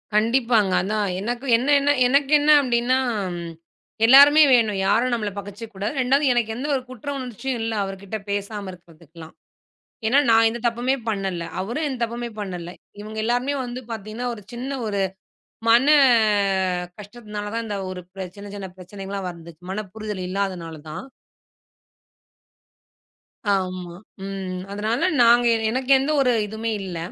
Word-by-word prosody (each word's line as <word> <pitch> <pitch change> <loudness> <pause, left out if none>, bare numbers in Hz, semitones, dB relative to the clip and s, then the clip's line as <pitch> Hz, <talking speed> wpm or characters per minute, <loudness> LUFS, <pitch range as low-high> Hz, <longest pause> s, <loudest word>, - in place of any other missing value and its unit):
கண்டிப்பாங்க. 230 -2 +3
அதான், 205 +1 -1
எனக்கு 240 +5 -3
என்ன 280 +4 +3 0.3
எனக்கு 275 +2 +2
என்ன 300 +1 +4
அப்டின்னா 245 0 +1 1.1
எல்லாருமே 285 +5 +8
வேணும். 220 -4 +3
யாரும் 235 +5 +2
நம்மள 215 -3 -1
பகச்சுக்க 205 +3 -9
கூடாது. 200 +5 -3
இரண்டாவது 265 +2 +3
எனக்கு 225 -2 0
எந்த 265 +5 -4
ஒரு 260 - -1
குற்ற 255 +2 -8
உணர்ச்சியும் 250 0 -4
இல்ல, 225 0 -2
அவர்கிட்ட 195 +2 -6
பேசாம 200 -1 -3
இருக்குறதுக்கெல்லாம். 165 -2 -14 0.7
ஏன்னா, 265 +5 +5
நான் 225 0 +6
எந்தத் 235 +1 -6
தப்புமே 240 +3 0
பண்ணல, 195 -4 -2 0.2
அவரு 230 +9 -3
எந்தத் 255 -4 -3
தப்புமே 235 +1 -3
பண்ணல. 180 -4 -5 0.3
இவங்க 215 +1 -8
எல்லாருமே 245 +4 0
வந்து 245 +1 -6
பாத்தீங்கன்னா 220 +3 -5
ஒரு 210 - -11
சின்ன 265 +3 -4
ஒரு 200 -2 -1 0.7
மன 240 +5 +5 1.1
கஷ்டத்துனால 210 0 -7
தான், 230 0 -2
இந்த 205 -1 -3
ஒரு 180 -1 -6
பிரச்சன 185 -2 -7
சின்ன 205 0 -9
சின்னப் 190 -2 -8
பிரச்சனைகள் 195 +1 -9
எல்லாம் 195 -2 -3
வந்துச்சி, 170 -1 -14
மனப்புரிதல் 210 0 -5
இல்லாதனாலதான். 170 - -4 2.5
ஆமா, 185 -2 -2 0.3
ம். 190 -2 -5
அதனால, 215 +5 0
நாங்க 240 +1 +6 0.2
எனக்கு 260 +3 -1
எந்த 275 +3 -1
ஒரு 255 -2 +3 0.2
இதுமே 220 +2 -4
இல்ல. 180 -3 -5
220 Hz, 135 wpm, -23 LUFS, 195-245 Hz, 2.5 s, எல்லாருமே